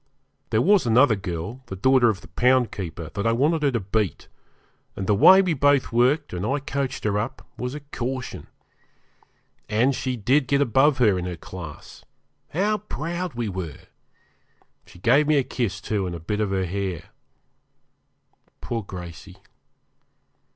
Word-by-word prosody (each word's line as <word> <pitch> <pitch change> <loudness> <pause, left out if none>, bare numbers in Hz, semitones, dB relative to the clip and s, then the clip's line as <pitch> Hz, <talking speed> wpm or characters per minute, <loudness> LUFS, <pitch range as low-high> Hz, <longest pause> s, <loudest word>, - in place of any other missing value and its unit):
There 115 0 +2
was 200 -7 +4
another 115 0 +5
girl, 95 +5 -5
the 95 - -6
daughter 125 +4 +4
of 100 -4 -2
the - - -14
poundkeeper, 95 -8 0
that 100 +1 -1
I 115 - +3
wanted 150 +7 +2
her 145 - +3
to 120 -3 -1
beat; 100 0 -2 0.7
and 95 - -4
the 105 - +2
way 190 - +7
we 180 -3 +1
both 145 -2 +2
worked, 130 - +2
and 90 +1 -3
I 135 +7 0
coached 135 -1 -3
her 105 -1 +1
up, 115 +5 -5
was 125 +3 -4
a 150 - -7
caution. 130 -2 -5 1.2
And 115 +6 +2
she 130 -1 -3
did 130 +5 +2
get 140 +1 +2
above 135 +2 +3
her 105 -7 +3
in 90 - -4
her 90 -2 -5
class. 80 -2 -10 0.5
How 210 +6 0
proud 175 - -5
we 120 -1 -2
were! 90 -6 -6 1.1
She - - -16
gave 135 +10 +3
me 155 -1 +4
a 140 - +3
kiss, 110 -7 -3
too, 100 -1 -2
and 85 - -5
a - - -6
bit 105 +6 -3
of 105 - 0
her 95 -1 0
hair. 95 -2 -4 1.5
Poor 115 -1 -3
Gracey! 90 -4 -10
115 Hz, 165 wpm, -24 LUFS, 95-140 Hz, 1.5 s, way